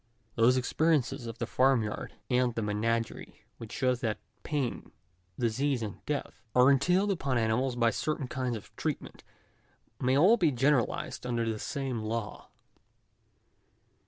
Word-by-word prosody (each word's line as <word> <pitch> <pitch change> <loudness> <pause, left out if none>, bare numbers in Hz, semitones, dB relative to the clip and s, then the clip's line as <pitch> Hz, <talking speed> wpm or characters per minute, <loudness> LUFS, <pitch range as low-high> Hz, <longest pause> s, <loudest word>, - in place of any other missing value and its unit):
Those 120 +3 +4
experiences 130 -2 +1
of 115 - -6
the - - -2
farm 130 -2 +3
yard 105 - -5
and 125 -2 +1
the 115 - -1
menagerie 115 +2 -2
which 115 -2 -8
show 130 -2 +1
that 120 -4 -2 0.2
pain, 140 -5 -3 0.5
disease, 125 +2 0
and 105 -2 -7
death, 150 -1 -3
are 125 +2 +7
entailed 180 +9 +3
upon 140 -9 0
animals 120 +3 +1
by 115 -1 +3
certain 150 -1 -2
kinds 125 -1 -2
of 105 - -14
treatment, - - -4 0.8
may 130 +1 +2
all 195 +10 +6
be 165 -7 +3
generalised 130 -1 +1
under 120 -2 -1
the 110 -1 -2
same 135 -4 -3
law. 110 -1 -4
125 Hz, 140 wpm, -30 LUFS, 115-140 Hz, 0.8 s, are